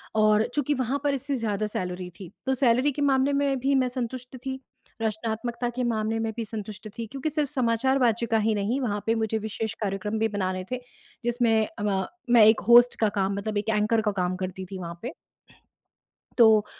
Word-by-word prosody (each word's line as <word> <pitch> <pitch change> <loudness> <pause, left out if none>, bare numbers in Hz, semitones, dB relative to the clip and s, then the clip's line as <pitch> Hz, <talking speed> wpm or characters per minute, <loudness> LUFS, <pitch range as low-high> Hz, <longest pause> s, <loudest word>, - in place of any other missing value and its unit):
और 215 0 +4
चूँकि 290 0 +1
वहाँ 260 +1 -1
पर 285 -1 +2
इससे 275 +1 -2
ज़्यादा 215 -3 -1
सैलरी 180 -2 -3
थी, 185 -2 -9
तो 265 - +2
सैलरी 255 +2 +3
के 290 - -5
मामले 275 0 +3
में 280 -1 +1
भी 275 +2 +2
मैं 260 -1 +3
संतुष्ट 250 +1 -5
थी, 265 0 -3 0.4
रचनात्मकता 225 +2 -2
के 250 - -1
मामले 225 -1 0
में 225 0 -1
भी 230 - -1
संतुष्ट 215 0 -6
थी, 230 - -3
क्योंकि 275 +6 -3
सिर्फ 295 -2 -1
समाचार 260 0 +1
वाचिका 235 -1 +2
ही 220 +1 +2
नहीं 210 +7 0
वहाँ 210 -4 -1
पे 225 - +2
मुझे 220 -1 0
विशेष 220 0 -3
कार्यक्रम 205 +2 -2
भी 225 - +2
बनाने 185 -3 -2
थे, 255 - -1 0.5
जिसमें 230 -3 +2
अमा 195 -2 0 0.2
मैं 235 -3 +7
एक 220 +1 +6
होस्ट 240 +1 +7
का 220 - +3
काम 195 +1 +1
मतलब 210 +1 -3
एक 205 +2 -1
एंकर 215 +2 +2
का 210 -1 0
काम 180 +1 0
करती 185 0 -5
थी 195 - -5
वहाँ 170 -1 -7
पे। 245 +6 -5 1.2
तो 220 -3 +6
225 Hz, 195 wpm, -26 LUFS, 210-255 Hz, 1.2 s, मैं